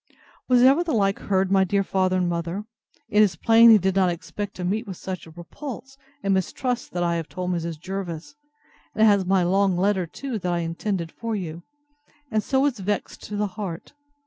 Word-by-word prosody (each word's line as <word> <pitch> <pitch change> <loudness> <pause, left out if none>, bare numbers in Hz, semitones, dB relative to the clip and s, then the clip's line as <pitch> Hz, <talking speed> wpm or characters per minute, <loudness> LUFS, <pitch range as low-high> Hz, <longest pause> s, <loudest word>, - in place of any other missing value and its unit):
Was 250 -1 +5
ever 275 +6 +6
the 330 -3 -2
like 195 -2 +1
heard, 190 -1 0
my 195 -1 +5
dear 195 +1 +1
father 185 -1 +1
and 180 -1 +1
mother? 170 +3 -3 0.4
It 210 - +3
is 200 -5 +3
plain 225 +6 +6
he 220 - +9
did 190 -1 0
not 190 -2 +4
expect 200 +4 -5
to 180 - -6
meet 210 +6 -1
with 190 -3 -6
such 185 -3 -6
a - - -11
repulse, 255 - -9 0.3
and 195 - +2
mistrusts 245 +6 -1
that 175 0 -2
I 170 -1 +1
have 165 -2 -5
told 180 0 -3
Mrs. 170 -2 -3
Jervis, 185 - -6 0.6
and 220 - +4
has 200 -3 +4
my 190 -1 +3
long 190 +1 +2
letter 190 -1 +1
too, 255 - -5
that 180 -1 -2
I 175 -1 0
intended 170 +1 -3
for 230 -1 -4
you; 170 -4 -5 0.7
and 215 - +2
so 265 +4 +1
is 265 -6 0
vexed 205 +2 -3
to 210 - -6
the 210 +1 0
heart. 190 -2 -6
195 Hz, 205 wpm, -24 LUFS, 175-215 Hz, 0.7 s, he